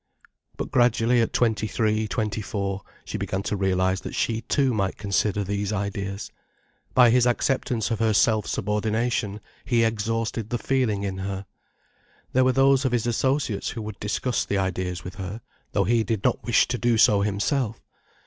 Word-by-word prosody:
But -, -, -4 dB
gradually, 120 Hz, -1 st, +3 dB
at 115 Hz, -, 0 dB
twenty 110 Hz, -2 st, +1 dB
three, 110 Hz, +1 st, 0 dB
twenty 110 Hz, 0 st, -2 dB
four, 100 Hz, -1 st, -3 dB, 0.2 s
she -, -, -4 dB
began 95 Hz, +1 st, -2 dB
to 105 Hz, -, -1 dB
realize 95 Hz, -1 st, +1 dB
that -, -, -6 dB
she 115 Hz, -1 st, 0 dB
too 135 Hz, -1 st, +1 dB
might 100 Hz, -3 st, -1 dB
consider 100 Hz, 0 st, 0 dB
these 100 Hz, +1 st, -2 dB
ideas. 100 Hz, -1 st, -3 dB, 0.6 s
By 125 Hz, -2 st, +7 dB
his 125 Hz, 0 st, +4 dB
acceptance 120 Hz, -2 st, 0 dB
of 115 Hz, -, -1 dB
her 115 Hz, -1 st, +2 dB
self 110 Hz, 0 st, +3 dB
subordination, 105 Hz, 0 st, -1 dB, 0.2 s
he 115 Hz, 0 st, +2 dB
exhausted 115 Hz, 0 st, -1 dB
the 120 Hz, -, -1 dB
feeling 120 Hz, -6 st, 0 dB
in 95 Hz, -1 st, -3 dB
her. 95 Hz, 0 st, -4 dB, 0.9 s
There 130 Hz, -, +4 dB
were 130 Hz, -, +4 dB
those 135 Hz, +1 st, +4 dB
of 130 Hz, -2 st, 0 dB
his 120 Hz, -2 st, +1 dB
associates 125 Hz, -2 st, 0 dB
who 115 Hz, -, -5 dB
would 105 Hz, -2 st, -7 dB
discuss 115 Hz, +4 st, -1 dB
the 100 Hz, -, -1 dB
ideas 90 Hz, -1 st, -2 dB
with 90 Hz, -, -8 dB
her, 95 Hz, +3 st, -6 dB, 0.3 s
though -, -, +2 dB
he 115 Hz, 0 st, +2 dB
did 110 Hz, -1 st, -2 dB
not -, -, +1 dB
wish 120 Hz, -, +3 dB
to 125 Hz, -1 st, -1 dB
do 120 Hz, -1 st, +2 dB
so 105 Hz, -2 st, +5 dB
himself. 105 Hz, +4 st, 0 dB
110 Hz, 175 wpm, -25 LUFS, 100-120 Hz, 0.9 s, By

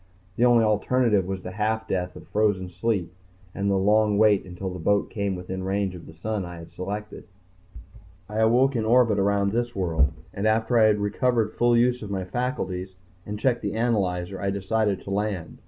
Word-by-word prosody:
The 120 Hz, -, +3 dB
only 120 Hz, -2 st, +5 dB
alternative 110 Hz, -2 st, +2 dB
was 95 Hz, -1 st, -4 dB
the 90 Hz, -, -6 dB
half 110 Hz, +2 st, -1 dB
death 90 Hz, -2 st, -2 dB
of -, -, -12 dB
frozen 105 Hz, -4 st, +1 dB
sleep 90 Hz, -2 st, -1 dB, 0.4 s
and 100 Hz, 0 st, -1 dB
the 100 Hz, -, +2 dB
long 105 Hz, +1 st, +3 dB
wait 105 Hz, -2 st, +4 dB
until 90 Hz, +1 st, -6 dB
the 90 Hz, -, -7 dB
boat 100 Hz, +4 st, +1 dB
came 100 Hz, -2 st, -2 dB
within 95 Hz, +1 st, -5 dB
range 95 Hz, 0 st, -1 dB
of 90 Hz, -2 st, -11 dB
the -, -, -11 dB
sun 105 Hz, +4 st, -3 dB
I 90 Hz, -1 st, -8 dB
had 85 Hz, 0 st, -11 dB
selected. 105 Hz, +3 st, -6 dB, 1.0 s
I 105 Hz, +2 st, -4 dB
awoke 125 Hz, +5 st, +3 dB
in 115 Hz, -, 0 dB
orbit 115 Hz, -2 st, +4 dB
around 100 Hz, 0 st, +2 dB
this 120 Hz, +2 st, -2 dB
world, 80 Hz, -6 st, +1 dB, 0.2 s
and 100 Hz, +2 st, -1 dB
after 115 Hz, +2 st, +2 dB
I 110 Hz, -, +6 dB
recovered 110 Hz, +2 st, +1 dB
full 120 Hz, 0 st, +3 dB
use 125 Hz, +1 st, +2 dB
of 105 Hz, -, -7 dB
my 95 Hz, -2 st, -3 dB
faculties 95 Hz, -5 st, -3 dB, 0.3 s
and 105 Hz, 0 st, -4 dB
checked 120 Hz, 0 st, +1 dB
the -, -, -3 dB
analyzer, 95 Hz, -5 st, -1 dB
I 100 Hz, -, 0 dB
decided 100 Hz, 0 st, 0 dB
to 100 Hz, -, -8 dB
land. 100 Hz, -4 st, -3 dB
105 Hz, 190 wpm, -25 LUFS, 95-110 Hz, 1.0 s, I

